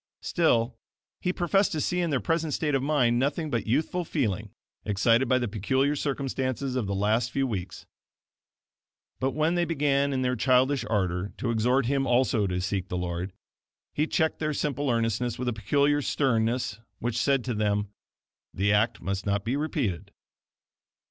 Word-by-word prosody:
Still, 120 -8 +1 0.4
he 180 - 0
professed 195 +3 +1
to 155 - -1
see 180 +4 0
in 175 -1 0
their 140 -4 +1
present 165 -1 0
state 150 -2 -1
of 135 - +2
mind 130 -5 +2
nothing 145 +3 -1
but 115 -5 -1
youthful 155 +9 0
feeling, 110 - -2 0.3
excited 115 +5 +2
by 130 - +4
the 120 -1 -1
peculiar 130 +8 0
circumstances 135 -2 -2
of 120 -6 -1
the 100 - -1
last 110 +4 +1
few 135 +2 0
weeks. 95 -7 -5 1.3
But 130 +1 -1
when 155 +2 +2
they 175 0 +2
began 140 -4 +1
in 130 -1 0
their 125 0 +1
childish 130 +3 +3
ardor 95 -2 -1
to 120 - -1
exhort 125 +4 +2
him 135 +1 +1
also 120 -4 +2
to 90 -1 -1
seek 95 -1 -2
the 90 - -3
Lord, 90 +1 -3 0.6
he 150 +2 0
checked 160 -1 0
their 155 -1 -1
simple 145 -1 -1
earnestness 115 0 0
with 125 - -3
a 120 - +1
peculiar 145 +6 +2
sternness 115 -5 0 0.2
which 120 -1 -3
said 135 -1 +2
to 125 - -2
them: 105 -1 0 0.7
"The 100 +2 +2
act 110 +3 +1
must 95 0 -3
not 100 0 0
be 120 +4 0
repeated." 140 - -2
125 Hz, 170 wpm, -27 LUFS, 110-145 Hz, 1.3 s, by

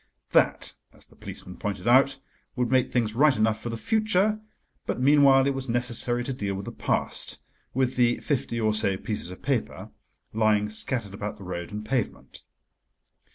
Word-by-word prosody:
That, - - +2 0.2
as - - -15
the - - -23
policeman 90 - -8
pointed 105 +2 -4
out, 135 +3 +5 0.4
would 125 -1 -1
make 130 -1 +2
things 115 -3 0
right 140 +3 +4
enough 110 0 +1
for 120 - -4
the 115 - -4
future, 215 - +1 0.5
but - - -2
meanwhile 135 0 +5
it 140 - +1
was 135 -1 -4
necessary 120 0 0
to 135 - -3
deal 100 -5 -3
with 100 +1 -6
the - - -6
past—with 130 0 -2
the 120 -1 +3
fifty 125 -4 -2
or 110 -1 +1
so 100 -3 +2
pieces 105 -4 -4
of 90 - -10
paper 130 -3 -2 0.4
lying 105 -1 +2
scattered 110 -1 -2
about 105 +1 -5
the 100 - -11
road 85 -2 -6
and 105 +1 -6
pavement. 120 0 -3
120 Hz, 170 wpm, -26 LUFS, 105-135 Hz, 0.5 s, out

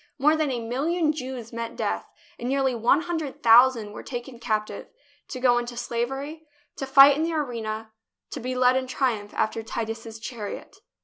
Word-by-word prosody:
More 300 +3 +4
than 310 -2 0
a 250 -2 -2
million 310 +6 0
Jews 255 -5 -7
met 230 0 -5
death, - - -2 0.3
and 240 - -3
nearly 270 -1 +1
one 240 +6 +3
hundred 325 -5 -4
thousand 235 -2 +6
were - - -7
taken 240 -1 -7
captive, 215 -3 -2 0.4
to 255 - -6
go 245 -1 +4
into 240 0 -6
slavery, 270 +7 -4 0.3
to 270 - -4
fight 275 +1 +8
in 300 - -2
the 330 +1 0
arena, 225 -6 -3 0.4
to - - -5
be 255 +2 -4
led 250 0 +4
in 260 0 -1
triumph 235 -6 -1
after 220 +1 0
Titus's 225 0 -5
chariot. 220 -2 -7
250 Hz, 175 wpm, -25 LUFS, 230-275 Hz, 0.4 s, fight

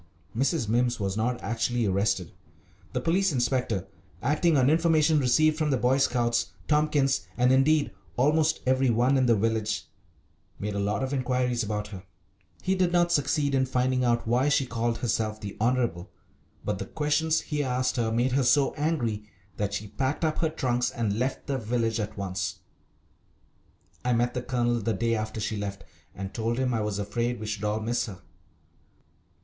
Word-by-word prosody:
Mrs. 135 0 +1
Mimms 120 +2 +1
was 100 -2 -1
not 120 +3 0
actually 115 +1 0
arrested. 100 -2 0 0.6
The - - -2
police 185 +3 +2
inspector 120 - 0 0.4
acting 150 +4 +2
on 130 -1 +4
information 160 0 +4
received 155 +4 +3
from 155 -1 +1
the 135 - +2
Boy 125 +3 +2
Scouts, 120 -3 +1
Tompkins, 150 -3 +2
and 125 +1 +4
indeed 145 +3 +3 0.3
almost 155 +4 +2
every 130 0 +3
one 120 +4 +3
in 130 -2 +3
the 115 - +5
village 110 0 -1 0.7
made 105 +1 -3
a 100 - -2
lot 100 +4 0
of 135 +1 -2
inquiries 125 -2 0
about 105 -1 -3
her. 95 -3 -8 0.6
He 190 - +1
did 185 -2 +1
not 175 -1 +3
succeed 145 -2 +1
in 130 -1 +2
finding 125 0 +1
out 120 -2 +1
why 125 +5 +2
she 140 -1 +2
called 120 -1 -1
herself 110 -2 -1
"the 100 -2 -7
Honourable," 120 -7 0 0.6
but - - -1
the - - -5
questions 155 +1 +1
he 150 -2 -2
asked 125 -1 0
her 115 -2 +1
made 120 +3 +1
her 135 +2 +2
so 135 +2 +3
angry 120 -9 -1 0.3
that 105 -1 -1
she 105 +1 -4
packed 135 +9 -1
up 155 - -1
her 160 - +2
trunks 125 -6 0
and 110 -3 -2
left 130 +2 -2
the 135 -1 -2
village 115 0 -1
at 105 0 -4
once. 95 -2 -3 1.4
I 125 - +1
met 120 +1 +1
the 125 - -2
Colonel 120 -1 0
the 115 +1 -1
day 115 +1 0
after 110 0 -3
she 110 +1 -2
left, 100 -1 -5 0.3
and 95 +1 -6
told 115 +1 -1
him 130 -1 0
I 115 - 0
was 105 -2 -2
afraid 115 +4 -2
we 110 - -5
should 105 -1 -4
all 105 +1 0
miss 120 +3 -1
her. 95 -5 -10
120 Hz, 180 wpm, -27 LUFS, 110-135 Hz, 1.4 s, the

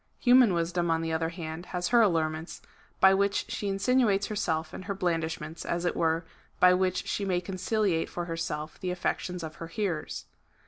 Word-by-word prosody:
Human 245 -6 +5
wisdom, 170 +1 0
on 165 0 +1
the 165 0 -2
other 160 0 0
hand, 165 0 -7
has 180 -1 -2
her 240 -1 +6
allurements, 160 -4 0 0.4
by 190 0 +7
which 200 +1 +1
she 205 - -3
insinuates 200 0 +2
herself^ 160 -6 -1
and 185 - -7
her 200 0 -3
blandishments, 165 -3 -2
as 170 +1 -2
it 175 - 0
were, 165 +1 +1 0.3
by 180 0 +7
which 185 0 0
she 205 - -1
may 185 -2 +1
conciliate 185 -1 -1
for 175 - -4
herself 165 -2 -4
the 185 - -3
affections 180 0 -2
of 155 -1 -7
her 165 - -6
hearers. 170 -2 -3
175 Hz, 180 wpm, -28 LUFS, 165-195 Hz, 0.4 s, by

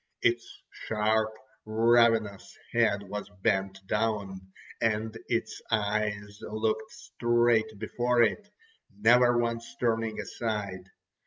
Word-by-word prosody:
Its 120 0 0
sharp, 110 0 0 0.3
ravenous 115 -2 +2
head 110 -4 +2
was 105 +1 -6
bent 95 0 0
down, 100 -3 -1 0.4
and 110 0 0
its 115 -1 -2
eyes 105 -1 -1
looked 110 0 -2
straight 120 -2 +1
before 120 +3 +1
it, 205 - -1 0.5
never 120 +2 +5
once 115 -1 -2
turning 115 -2 0
aside. 100 -5 -4
110 Hz, 95 wpm, -28 LUFS, 105-115 Hz, 0.5 s, never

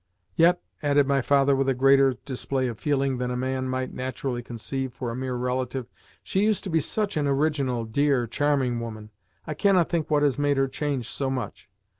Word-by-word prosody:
Yet," 175 +2 +5 0.2
added 145 -1 +3
my 140 -1 +2
father 140 +1 +3
with 135 0 +1
a 135 - +1
greater 135 0 +5
display 130 -1 -2
of 115 -3 -5
feeling 135 -3 0
than 125 0 -1
a 125 - -2
man 130 0 -2
might 130 0 -2
naturally 130 -1 -3
conceive 125 +2 -5
for 120 -3 -4
a - - -5
mere 130 0 -3
relative, 125 0 -2 0.3
"she 190 - 0
used 215 -1 +2
to 190 - -4
be 165 - +3
such 205 +4 -2
an 145 -1 +1
original, 140 -4 0
dear, 135 +2 +1
charming 130 -1 0
woman! 110 -2 -7 0.3
I 155 - -3
cannot 185 0 +3
think 165 -3 -1
what 150 -1 +3
has 145 -1 +2
made 145 -1 +2
her 135 0 +2
change 135 -3 -3
so 135 +1 -2
much. 130 -6 -5
135 Hz, 200 wpm, -25 LUFS, 125-145 Hz, 0.3 s, Yet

